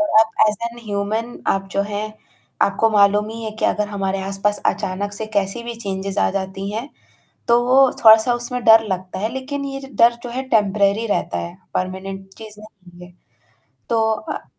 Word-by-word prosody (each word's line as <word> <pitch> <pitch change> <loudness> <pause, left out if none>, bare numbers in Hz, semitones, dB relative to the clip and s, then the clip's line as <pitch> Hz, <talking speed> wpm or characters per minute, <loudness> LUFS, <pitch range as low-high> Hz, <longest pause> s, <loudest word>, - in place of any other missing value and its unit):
और 315 - +1
आप 220 - +2 0.2
as 210 - -1
an 240 - -13
human 215 +3 -3
आप 195 0 0
जो 200 - +1
हैं 215 +1 -3 0.5
आपको 210 +3 +2
मालूम 205 0 +4
ही 225 +1 -7
है 220 - -3
कि - - 0
अगर 210 0 +1
हमारे 195 -1 -2
आस-पास 195 +2 -1
अचानक 200 0 -2
से 215 +1 -5
कैसी 200 +4 0
भी 235 0 -6
चेंजेस 195 -2 -4
आ - - +3
जाती 195 0 -4
हैं, 230 +7 -4 0.6
तो 235 +1 +5
वो 260 +2 +5 0.2
थोड़ा-सा 220 +2 +7
उसमें 240 0 -4
डर 225 0 +7
लगता 185 0 -5
है 220 +4 -2
लेकिन 280 +2 -4
ये 275 0 -5 0.2
डर 235 +1 +6
जो 245 - -6
है 255 +2 -3
टेम्परेरी 205 0 +2
रहता 205 - -1
है, 170 +1 -6 0.2
परमानेंट 190 +1 -4
चीज़ 215 -1 -11
नहीं 180 -4 -15
है। 175 - -18 0.8
तो 230 -1 +2
अ 310 +7 -6
210 Hz, 185 wpm, -20 LUFS, 195-230 Hz, 0.8 s, थोड़ा-सा